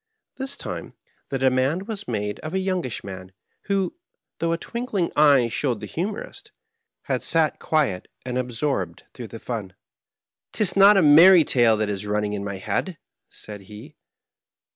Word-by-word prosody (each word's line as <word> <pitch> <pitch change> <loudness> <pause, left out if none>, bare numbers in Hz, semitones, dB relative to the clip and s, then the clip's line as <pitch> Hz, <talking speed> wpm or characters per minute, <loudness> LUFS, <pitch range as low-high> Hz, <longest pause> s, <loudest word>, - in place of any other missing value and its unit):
This 270 +1 -3
time - - -7 0.3
the 135 - -1
demand 130 +8 +1
was 215 -3 -5
made 105 -3 -3
on 155 +4 -5
a - - +2
young 185 -1 -1
ish 125 - -5
man, 95 -1 -9 0.3
who, 195 - 0 0.5
though 165 0 0
a 165 - +1
twinkling 225 -3 -3
eye 140 -5 +5
showed 115 0 -1
the 105 - -6
humorist, 180 - -5 0.5
had - - -1
sat 160 -3 +1
quiet 140 - 0 0.2
and 125 -1 -4
absorbed 125 - -2
through 120 -3 -8
the 115 - -9
fun. 105 -6 -6 0.4
" - - -69
'Tis 210 -4 0
not 200 +1 +7
a 190 - +5
merry 165 +4 +8
tale 120 -5 +3
that 105 0 0
is 105 0 -3
running 105 0 -1
in 100 -1 -3
my 100 -1 -4
head,'^ 170 - -3 0.3
said 105 -1 -9
he. 110 +9 -11
130 Hz, 165 wpm, -24 LUFS, -, 0.5 s, merry